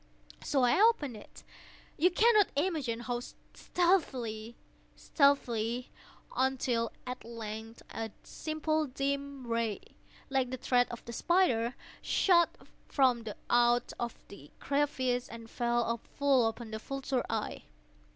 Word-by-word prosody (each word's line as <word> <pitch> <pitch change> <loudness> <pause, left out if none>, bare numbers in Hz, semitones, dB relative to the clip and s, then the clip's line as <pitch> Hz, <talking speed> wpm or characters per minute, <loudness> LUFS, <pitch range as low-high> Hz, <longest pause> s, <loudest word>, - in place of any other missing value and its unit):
So 270 -3 +1
I 245 +10 +4
opened 365 - +3
it—you 300 +9 -4
cannot 425 +2 +5
imagine 285 -8 -1
how 245 0 -2 0.3
stealthily, 250 - 0 0.4
stealthily—until, 250 -1 0
at 250 0 -6
length 225 -1 -7
a 225 0 -4
simple 310 0 -1
dim 280 0 -3
ray, 230 -3 -1 0.5
like 265 -2 +1
the 260 - -4
thread 245 -1 +2
of 235 - -8
the 235 - -7
spider, 250 -8 +2 0.3
shot 345 -3 +4 0.4
from 255 -4 +3 0.2
out 240 0 +3 0.3
the 145 -8 -13
crevice 260 -3 0
and 230 0 -9
fell 235 0 0 0.2
full 275 -5 +4
upon 225 0 -5
the 220 - -4
vulture 270 +1 -2
eye. 220 -1 -3
250 Hz, 110 wpm, -31 LUFS, 230-285 Hz, 0.5 s, cannot